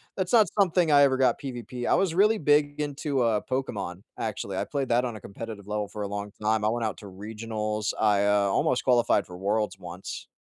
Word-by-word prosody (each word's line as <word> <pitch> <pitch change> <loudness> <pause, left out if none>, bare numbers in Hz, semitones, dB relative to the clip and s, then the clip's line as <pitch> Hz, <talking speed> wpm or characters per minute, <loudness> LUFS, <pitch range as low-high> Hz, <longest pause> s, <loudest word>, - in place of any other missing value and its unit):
that's 185 -2 -2
not 225 -3 +6
something 180 -4 +3
I 145 -1 +7
ever 135 -2 +3
got 130 -1 +2
PvP 125 -2 -5
I - - +4
was 190 -4 +1
really 210 +4 +4
big 145 -3 +2
into, 145 -2 -1
uh, 115 -3 +2
Pokémon, 100 -8 -3 0.2
actually, 100 -3 -3
I - - 0
played 140 -3 -3
that 120 +1 +3
on 120 -3 -4
a - - -8
competitive 100 0 -8
level 105 0 -2
for 105 +1 -6
a - - -2
long 100 0 -5
time, 110 0 +1
I 105 - +3
went 115 0 -1
out 110 - -3
to 105 - -10
Regionals, 105 +1 -4
I, 105 -2 +3
uh, 105 -1 +3
almost 125 +6 +1
qualified 120 -5 +3
for 90 - -11
Worlds 105 +1 -1
once. 90 +1 -8
110 Hz, 220 wpm, -27 LUFS, 105-135 Hz, 0.2 s, I